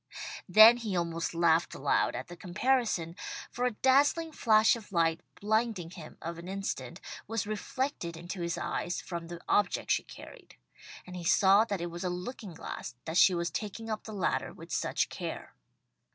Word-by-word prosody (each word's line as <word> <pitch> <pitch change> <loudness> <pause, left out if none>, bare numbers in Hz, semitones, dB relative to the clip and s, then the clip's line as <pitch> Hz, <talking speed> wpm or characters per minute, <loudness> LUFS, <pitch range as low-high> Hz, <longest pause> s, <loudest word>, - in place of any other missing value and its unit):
Then 220 +5 +9
he 220 -5 -3
almost 170 0 -2
laughed 170 0 +3
aloud 140 - +1
at 130 +2 -4
the 175 - -9
comparison, 190 -3 0 0.4
for 250 - -1
a 250 - +2
dazzling 285 +7 +3
flash 220 -6 +4
of 220 -3 -11
light, 165 -2 +2 0.2
blinding 215 -5 0
him 165 -4 -11
for 170 0 -5
an 170 - -9
instant, 195 +1 -4 0.3
was 225 -3 -2
reflected 215 - -3
into 175 +2 -6
his 170 0 -2
eyes 175 - -2
from 170 -2 -6
the 170 0 -7
object 205 -3 +1
she - - +3
carried, - - -13 0.5
and 180 - -9
he 180 - -6
saw 195 +4 +5
that 200 -5 -3
it 170 0 -4
was 175 +2 -6
a 180 - 0
looking 180 +1 -6
glass 125 - -7
that 160 +2 -2
she 185 - +6
was 170 0 -1
taking 220 +4 -5
up 215 - -4
the 220 - -7
ladder 195 -4 -1
with - - -12
such - - 0
care. - - -6
185 Hz, 180 wpm, -30 LUFS, 170-220 Hz, 0.5 s, Then